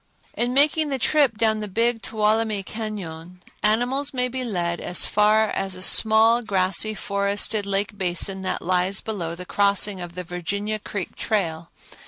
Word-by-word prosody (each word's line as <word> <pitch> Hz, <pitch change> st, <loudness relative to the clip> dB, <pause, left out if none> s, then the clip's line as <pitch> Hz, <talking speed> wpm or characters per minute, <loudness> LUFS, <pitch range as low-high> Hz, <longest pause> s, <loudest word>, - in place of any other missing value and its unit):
In 245 Hz, +1 st, -1 dB
making 300 Hz, +2 st, +3 dB
the 270 Hz, -, -1 dB
trip 270 Hz, -3 st, +2 dB
down 220 Hz, -1 st, +1 dB
the 210 Hz, -, -4 dB
Big 230 Hz, +3 st, 0 dB
Tuolumne 215 Hz, -1 st, 0 dB
Cañon, 185 Hz, -6 st, -6 dB, 0.3 s
animals 250 Hz, +7 st, +1 dB
may 250 Hz, 0 st, +1 dB
be 255 Hz, +1 st, -4 dB
led 175 Hz, -7 st, -2 dB
as 175 Hz, -, +2 dB
far 215 Hz, +1 st, +3 dB
as 195 Hz, -1 st, -2 dB
a 185 Hz, -, -4 dB
small, 220 Hz, +3 st, +5 dB
grassy, 195 Hz, 0 st, 0 dB
forested 200 Hz, +1 st, -1 dB
lake 200 Hz, +1 st, -1 dB
basin 190 Hz, +1 st, -1 dB
that 190 Hz, -, -3 dB
lies 185 Hz, +2 st, +1 dB
below 175 Hz, -7 st, -4 dB
the 180 Hz, +1 st, -8 dB
crossing 200 Hz, 0 st, +1 dB
of 175 Hz, -1 st, -8 dB
the 180 Hz, -, -4 dB
Virginia 200 Hz, +5 st, -4 dB
Creek 200 Hz, -3 st, -6 dB
trail. 170 Hz, -6 st, -2 dB
210 Hz, 160 wpm, -23 LUFS, 185-225 Hz, 0.3 s, small